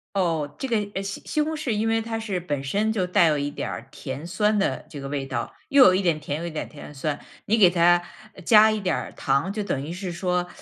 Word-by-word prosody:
哦， 165 -6 0
这 270 - -3
个， 235 - +1 0.2
呃， 195 - -2
西 195 0 -5
西 305 - 0
红 315 +1 -2
柿 305 -4 -3
因 215 0 0
为 225 0 +2
它 225 0 -3
是 205 -5 -3
本 145 -5 -3
身 205 +10 0
就 190 -5 0
带 180 -1 +4
有 155 -2 +3
一 145 0 -2
点 - - -4
儿 115 - -6
甜 135 +4 -6
酸 210 +4 +1
的 195 - -1
这 145 - -8
个 135 - -6
味 140 -1 -3
道， 120 -3 -4 0.2
又 275 -2 +7
有 185 - +6
一 185 - +2
点 170 -5 +1
甜， 150 -1 -4
又 165 - -5
有 - - -2
一 - - -6
点 155 - -4
甜 150 -1 -11
酸。 145 +1 -2 0.3
你 225 +3 +2
给 195 -4 +8
它 175 0 +4 0.4
加 215 -1 +7
一 215 -1 -1
点 185 -4 0
儿 - - -5
糖， 140 +8 0
就 210 0 -3
等 170 -9 -2
于 155 - -5
是 185 +1 -5
说， 180 0 -1
180 Hz, 290 characters per minute, -24 LUFS, 150-210 Hz, 0.4 s, 给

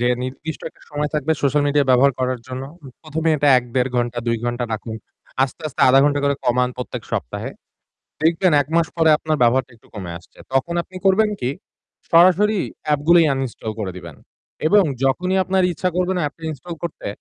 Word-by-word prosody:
যে 120 - +1 0.2
নির্দিষ্ট 135 +5 -6
একটা - - -25
সময় 150 0 -2
থাকবে 150 +1 +1
সোশ্যাল 145 +1 +2
মিডিয়া 145 -1 +2
ব্যবহার 135 +2 +5
করার 130 -1 -1
জন্য। 130 +1 -5 0.4
১ম, 155 0 -4
এ - - +4
এটা 145 0 +2
১-১.৫ 125 +1 -2
ঘণ্টা, 120 0 -1
২ 115 - +1
ঘণ্টা 120 0 -1
রাখুন। 110 +1 -5 0.5
আস্তে, 135 +4 -2
আস্তে 145 - -8
০.৫ 135 +1 +6
ঘণ্টা 145 0 +2
করে 140 0 +2
কমান 125 +1 +2
প্রত্যেক 125 - -6
সপ্তাহে। - - -3 0.7
দেখবেন 170 +2 +3
১ - - -18
মাস 170 - +3
পরে 160 -1 +4
আপনার 155 0 -1
ব্যবহারটা 130 +2 +2
একটু - - -25
কমে 95 -5 -6
আসছে। 85 - -23
তখন 135 +6 0
আপনি 185 - -14
করবেন 210 +3 +4
কি? 125 - -1 0.6
সরাসরি 185 +5 +5 0.3
app 145 - +1
গুলিই 170 -1 +7
uninstall 130 -4 -4
করে 95 -3 -3
দিবেন 85 -5 -10 0.5
এবং 200 +4 +5 0.2
যখনই 180 +8 +1
আপনার 190 0 +1
ইচ্ছা 185 +3 -1
করবে 180 +1 +1
না - - 0
app 145 - -22
টা - - -20
install 165 +4 -8
করতে, 170 -2 -6
140 Hz, 190 wpm, -20 LUFS, 125-170 Hz, 0.7 s, গুলিই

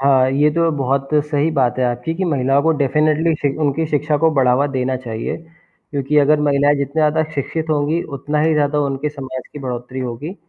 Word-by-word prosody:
हाँ, 135 -1 +3
ये 145 +3 +3
तो 165 +2 +1
बहुत 135 0 -1 0.2
सही 150 +1 0
बात 130 -2 +1
है 130 - +2
आपकी 125 +6 -2
कि 190 - -2
महिला 140 -4 +2
को 160 +3 +2
डेफ़िनेटली 155 +3 +2
शिक 140 0 -1
उनकी 150 +2 +1
शिक्षा 150 0 0
को 160 +1 +3
बढ़ावा 130 0 +3
देना 130 -2 -1
चाहिए, 115 -3 -5 0.5
क्योंकि 140 0 -1
अगर 150 +1 +4
महिलाएँ 145 0 +3
जितने 140 -1 -3
ज़्यादा 155 +1 +2
शिक्षित 155 +3 -3
होंगी, 155 +3 0
उतना 150 +1 -3
ही 160 +1 +2
ज़्यादा 150 0 +1
उनके 140 +1 -1
समाज 130 -3 -7
की - - -8
बढ़ोत्तरी 125 -1 -5
होगी। 130 +8 -5
145 Hz, 195 wpm, -18 LUFS, 130-150 Hz, 0.5 s, अगर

